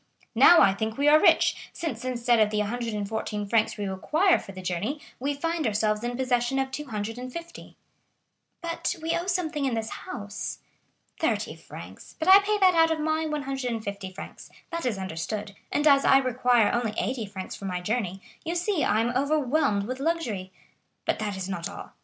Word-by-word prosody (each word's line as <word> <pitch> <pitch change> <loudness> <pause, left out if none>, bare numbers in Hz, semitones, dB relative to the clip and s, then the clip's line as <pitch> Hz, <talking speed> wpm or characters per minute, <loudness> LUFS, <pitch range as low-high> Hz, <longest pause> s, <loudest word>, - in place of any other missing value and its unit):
Now 350 - +8
I 195 - +6
think 220 +2 -3
we 285 +1 +2
are 305 +1 +7
rich, - - +3
since 270 -9 -4
instead 240 -2 +1
of 215 -1 +4
the 210 - -2
114 210 -1 -2
francs 220 +2 +1
we 205 - -3
require 310 - +2
for - - -10
the 190 - -9
journey 185 - -2 0.2
we 280 +3 -1
find 330 -1 -1
ourselves 215 0 0
in 240 0 -2
possession 250 0 +1
of 265 0 -1
250." 255 +5 -6 0.9
"But 335 +2 -2
we 325 +1 -2
owe 345 +2 -2
something 335 -5 -1
in 260 -4 0
this 225 -1 -3
house?" 205 0 -6 0.6
"Thirty - - 0
francs; - - -12
but 320 - -3
I 380 +1 +10
pay 420 +1 0
that 375 -2 +5
out 325 -1 +5
of 320 -1 0
my 315 +1 0
150 245 -10 -3
francs,—that 335 - -8
is 225 -5 -1
understood,—and 195 - -4
as 280 -2 +6
I 270 - +6
require 250 -3 +3
only 235 -3 -1
eighty 245 -5 -2
francs 190 -2 -7
for 200 - -9
my 180 -2 -2
journey, 195 -1 -2 0.2
you 335 +1 -3
see 355 -1 0
I 215 +2 +2
am 240 +2 -1
overwhelmed 280 -6 +1
with 255 +5 -5
luxury. 255 - -2 0.5
But - - 0
that 205 -2 -3
is 190 -1 -4
not 175 -3 -4
all. - - -9
245 Hz, 175 wpm, -26 LUFS, 210-305 Hz, 0.9 s, I